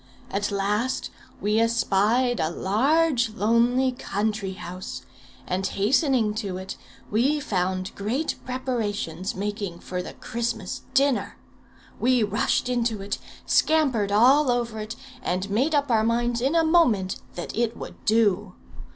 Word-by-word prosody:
At 200 Hz, +1 st, -1 dB
last 210 Hz, +5 st, -1 dB, 0.3 s
we 210 Hz, +2 st, +1 dB
espied 230 Hz, +2 st, +2 dB
a 155 Hz, -, +1 dB
large 250 Hz, -, +2 dB
lonely 235 Hz, +4 st, +3 dB
country 210 Hz, -4 st, -2 dB
house, 185 Hz, -1 st, -7 dB, 0.4 s
and 185 Hz, +1 st, -2 dB
hastening 230 Hz, -, +2 dB
to 190 Hz, -4 st, -4 dB
it, 190 Hz, 0 st, -6 dB, 0.4 s
we 265 Hz, +8 st, +2 dB
found 185 Hz, -7 st, -2 dB
great 240 Hz, +10 st, -1 dB
preparations 220 Hz, -8 st, -3 dB
making 200 Hz, -2 st, -3 dB
for 180 Hz, +1 st, -4 dB
the -, -, -8 dB
Christmas 230 Hz, -5 st, -4 dB
dinner. 275 Hz, -1 st, +2 dB, 0.6 s
We 250 Hz, -1 st, +3 dB
rushed 210 Hz, +3 st, +1 dB
into 235 Hz, -4 st, 0 dB
it, 200 Hz, -, -3 dB, 0.3 s
scampered 265 Hz, -11 st, +2 dB
all 260 Hz, +7 st, +5 dB
over 235 Hz, -2 st, 0 dB
it, 215 Hz, +2 st, -5 dB, 0.3 s
and 185 Hz, +2 st, -1 dB
made 270 Hz, +9 st, +2 dB
up 285 Hz, -2 st, +1 dB
our 220 Hz, -1 st, +4 dB
minds 235 Hz, +1 st, +1 dB
in 275 Hz, +6 st, +1 dB
a 330 Hz, -, +5 dB
moment 250 Hz, -, +3 dB, 0.2 s
that 175 Hz, -, -5 dB
it 230 Hz, 0 st, 0 dB
would -, -, -9 dB
do. 210 Hz, -3 st, +2 dB
225 Hz, 135 wpm, -25 LUFS, 200-250 Hz, 0.6 s, all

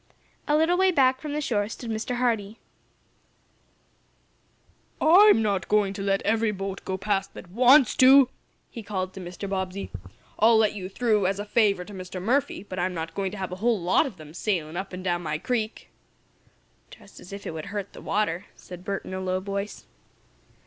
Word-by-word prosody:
A 295 Hz, 0 st, +3 dB
little 340 Hz, +3 st, +2 dB
way 380 Hz, 0 st, +5 dB
back 260 Hz, -6 st, +3 dB
from 295 Hz, 0 st, -5 dB
the 300 Hz, -, -1 dB
shore 210 Hz, -7 st, -1 dB
stood 230 Hz, 0 st, -6 dB
Mr. 220 Hz, +3 st, -3 dB
Hardee. 225 Hz, -4 st, -1 dB, 2.4 s
"I'm 350 Hz, -, +6 dB
not 200 Hz, -3 st, -1 dB
going 205 Hz, -2 st, +2 dB
to 200 Hz, -, -6 dB
let 195 Hz, 0 st, 0 dB
every 225 Hz, +1 st, +1 dB
boat 195 Hz, -1 st, -5 dB
go 190 Hz, -, -3 dB
past 195 Hz, 0 st, -2 dB
that 175 Hz, -, -11 dB
wants 255 Hz, +4 st, +6 dB
to!" 265 Hz, 0 st, +7 dB, 0.4 s
he 235 Hz, -, -7 dB
called 190 Hz, -3 st, -4 dB
to -, -, -9 dB
Mr. 180 Hz, +2 st, -7 dB
Bobbsey. 190 Hz, 0 st, -4 dB, 0.5 s
"I'll 225 Hz, +1 st, +6 dB
let 220 Hz, -2 st, +3 dB
you 190 Hz, -3 st, -6 dB
through, 210 Hz, -2 st, +1 dB
as 195 Hz, +1 st, -1 dB
a 205 Hz, -, -4 dB
favor 205 Hz, -4 st, +2 dB
to 205 Hz, -, -11 dB
Mr. 185 Hz, 0 st, -7 dB
Murphy, 240 Hz, +1 st, 0 dB
but 185 Hz, -3 st, -7 dB
I'm 180 Hz, +1 st, -1 dB
not 165 Hz, 0 st, -5 dB
going 195 Hz, -1 st, -2 dB
to 210 Hz, -, -8 dB
have 190 Hz, -2 st, -4 dB
a 180 Hz, -, -5 dB
whole 225 Hz, +1 st, +1 dB
lot 180 Hz, -, +2 dB
of 220 Hz, -8 st, -10 dB
them 155 Hz, -1 st, -12 dB
sailin' 170 Hz, -4 st, -2 dB
up 190 Hz, +2 st, -4 dB
and 185 Hz, 0 st, -7 dB
down 175 Hz, -2 st, 0 dB
my 155 Hz, -2 st, -2 dB
creek!" 220 Hz, +4 st, -3 dB, 1.0 s
"Just -, -, -15 dB
as 180 Hz, -, -13 dB
if 200 Hz, 0 st, -8 dB
it -, -, -4 dB
would 160 Hz, -1 st, -6 dB
hurt 200 Hz, -1 st, -5 dB
the -, -, -11 dB
water," 200 Hz, -3 st, -1 dB
said 180 Hz, 0 st, -11 dB
Bert, 195 Hz, 0 st, -4 dB
in -, -, -7 dB
a 185 Hz, -, -3 dB
low 185 Hz, 0 st, -1 dB
voice. 200 Hz, +1 st, -5 dB
200 Hz, 195 wpm, -26 LUFS, 185-230 Hz, 2.4 s, to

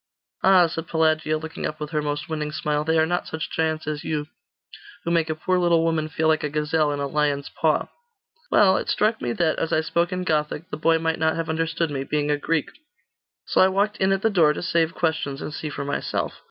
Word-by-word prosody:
'Ah,' 190 Hz, -2 st, +6 dB
said 165 Hz, 0 st, -4 dB
Pelagia, 155 Hz, -1 st, +1 dB
looking 160 Hz, +1 st, -5 dB
up 155 Hz, -, -7 dB
with 150 Hz, 0 st, -5 dB
her 155 Hz, -2 st, 0 dB
most 145 Hz, 0 st, -3 dB
winning 155 Hz, -2 st, -3 dB
smile, 150 Hz, -1 st, -1 dB
'they 160 Hz, +1 st, +1 dB
are 160 Hz, -, +4 dB
not 175 Hz, +2 st, -2 dB
such 160 Hz, -1 st, -5 dB
giants 160 Hz, -1 st, -1 dB
as 150 Hz, -1 st, -4 dB
you, 150 Hz, -2 st, -2 dB, 0.8 s
who 170 Hz, -, -2 dB
make 165 Hz, -2 st, +2 dB
a 155 Hz, -, -1 dB
poor 185 Hz, +3 st, 0 dB
little 170 Hz, -2 st, +3 dB
woman 160 Hz, -2 st, 0 dB
feel 160 Hz, 0 st, 0 dB
like 155 Hz, 0 st, +2 dB
a 150 Hz, -, -1 dB
gazelle 150 Hz, 0 st, +1 dB
in 145 Hz, -, -3 dB
a 140 Hz, -, -1 dB
lion's 145 Hz, 0 st, 0 dB
paw!' 155 Hz, -1 st, +1 dB, 0.6 s
'Well 190 Hz, -2 st, +5 dB
it -, -, -3 dB
struck 215 Hz, +2 st, +1 dB
me 120 Hz, -, -1 dB
that, 160 Hz, +1 st, 0 dB
as 165 Hz, -, -2 dB
I 155 Hz, -, +3 dB
spoke 170 Hz, +2 st, 0 dB
in 185 Hz, 0 st, -2 dB
Gothic, 155 Hz, 0 st, -1 dB
the -, -, -2 dB
boy 165 Hz, +1 st, +3 dB
might 160 Hz, 0 st, -1 dB
not 160 Hz, 0 st, +2 dB
have 165 Hz, 0 st, -3 dB
understood 165 Hz, 0 st, -1 dB
me, 135 Hz, -1 st, -2 dB
being 150 Hz, +1 st, -1 dB
a 145 Hz, -, +2 dB
Greek. 160 Hz, +1 st, -1 dB, 0.7 s
So -, -, +2 dB
I 185 Hz, -, +7 dB
walked 200 Hz, +2 st, 0 dB
in 190 Hz, 0 st, +2 dB
at 195 Hz, 0 st, 0 dB
the 225 Hz, -, +3 dB
door, 160 Hz, -6 st, +4 dB
to -, -, -5 dB
save 170 Hz, -2 st, +1 dB
questions, 160 Hz, -4 st, -1 dB
and 150 Hz, -, -6 dB
see 155 Hz, -, -4 dB
for 140 Hz, 0 st, -5 dB
myself. 140 Hz, -, -2 dB
160 Hz, 235 wpm, -24 LUFS, 150-165 Hz, 0.8 s, I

